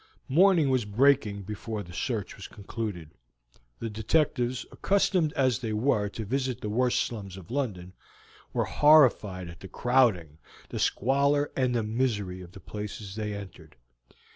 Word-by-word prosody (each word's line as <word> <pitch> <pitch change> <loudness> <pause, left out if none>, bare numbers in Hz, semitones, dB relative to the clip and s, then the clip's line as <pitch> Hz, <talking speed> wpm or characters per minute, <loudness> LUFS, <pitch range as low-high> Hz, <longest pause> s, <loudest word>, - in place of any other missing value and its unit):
Morning 165 -1 +4
was 130 -2 +2
breaking 105 -2 +2
before 105 +1 -5
the 90 -1 -12
search 105 +2 -3
was 100 - -9
concluded. 100 -6 -6 0.7
The 115 - -4
detectives, 125 +3 0
accustomed 190 -5 +1
as 130 -5 +1
they 115 -3 -3
were 105 -2 +1
to 110 +2 -6
visit 130 +1 -2
the 105 - -3
worst 125 +2 +2
slums 100 -5 -5
of 95 +2 -12
London, 100 -10 -3 0.6
were - - 0
horrified 120 - +4
at 85 0 -11
the 95 - -9
crowding, 105 - +1 0.3
the - - -5
squalor, 140 +4 +2
and 130 -2 +1
the 115 - +1
misery 105 -5 -1
of 90 0 -12
the - - -11
places 105 0 -7
they 105 -1 -3
entered. 95 -6 -10
110 Hz, 150 wpm, -28 LUFS, 100-130 Hz, 0.7 s, Morning